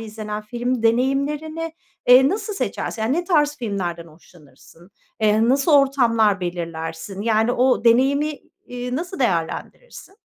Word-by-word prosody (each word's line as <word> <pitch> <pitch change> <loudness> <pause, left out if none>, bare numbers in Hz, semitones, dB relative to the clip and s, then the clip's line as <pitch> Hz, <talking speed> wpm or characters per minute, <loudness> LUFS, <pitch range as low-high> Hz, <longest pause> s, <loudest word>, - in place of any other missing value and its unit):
izlenen 215 -1 -6
film 240 +2 -3
deneyimlerini, 285 +7 0 0.4
eee, 255 +2 +7
nasıl 420 +4 -3
seçersin? 230 - -3
Yani, 225 +4 0
ne 350 - -1
tarz 295 -5 +1
filmlerden 180 -7 -4
hoşlanırsın? 165 +2 -19 0.3
Eee, 220 +2 +3
nasıl 275 +5 +2
ortamlar 235 -8 +3
belirlersin? 170 +2 -5
Yani, 225 +1 +2
o 250 -1 +2
deneyimi, 280 +5 +2 0.3
iii, 250 0 -5
nasıl 355 +5 -5
değerlendirirsin? 240 - -3
240 Hz, 125 wpm, -21 LUFS, 205-280 Hz, 0.4 s, eee